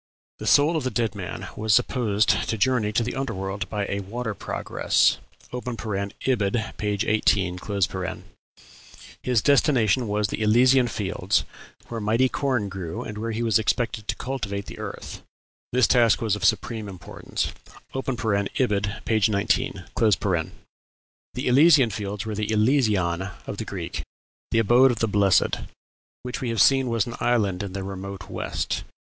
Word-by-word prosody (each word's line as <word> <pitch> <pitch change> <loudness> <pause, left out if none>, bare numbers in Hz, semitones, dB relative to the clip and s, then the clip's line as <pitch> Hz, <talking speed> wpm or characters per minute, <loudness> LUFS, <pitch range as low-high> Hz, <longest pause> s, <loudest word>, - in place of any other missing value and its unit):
The - - -5
soul 150 +4 +5
of 155 - -2
the 130 - 0
dead 115 -2 -1
man 95 -4 -6
was 110 0 +2
supposed 110 -4 +1
to 110 - +1
journey 120 -2 +2
to 115 +2 +1
the 120 - -3
under 135 -5 -3
world 95 +3 -4
by 105 -2 -2
"a 100 - -2
water 110 +3 -4
progress" - - +1 0.3
(Ibid., 110 -1 -2
p. 105 - -3 0.2
18), 95 -4 +1 1.6
his 125 -4 +1
destination 130 - +3
was 105 0 0
the - - -4
Elysian 125 +4 +5
Fields, 95 -3 0 0.4
where 115 -1 -5
mighty 115 +5 +2
corn 130 -7 0
grew, 95 -4 -5
and 105 0 -7
where 115 +1 -3
he 115 +1 -2
was 115 -1 +3
expected 110 -1 -1
to - - -1
cultivate 105 -7 -4
the - - -10
earth; - - -7 0.5
"this 125 0 +4
task 120 -3 +4
was 110 -3 0
of 105 - -7
supreme 110 -3 0
importance." 90 -2 -4 0.4
(Ibid., 105 -4 -1
p. 110 -1 +1
19.) 100 -1 0 1.5
The 125 - -3
Elysian 140 -1 +6
Fields 100 +1 -4
were 110 - -3
the 105 0 -2
"Elysion" 105 -6 +2
of 100 - -6
the 110 - -4
Greeks, 90 -6 -5 0.5
the - - 0
abode 120 +4 +5
of 120 - -1
the 115 - +1
blessed, 100 -2 +3 0.7
which 125 0 -5
we 125 - -2
have 115 -2 -1
seen 135 +3 +5
was 115 -3 +1
an 120 - -6
island 100 -6 +1
in 100 -2 -5
the 100 0 -4
remote 95 0 -7
west. - - -3
110 Hz, 155 wpm, -24 LUFS, 100-125 Hz, 1.6 s, Elysian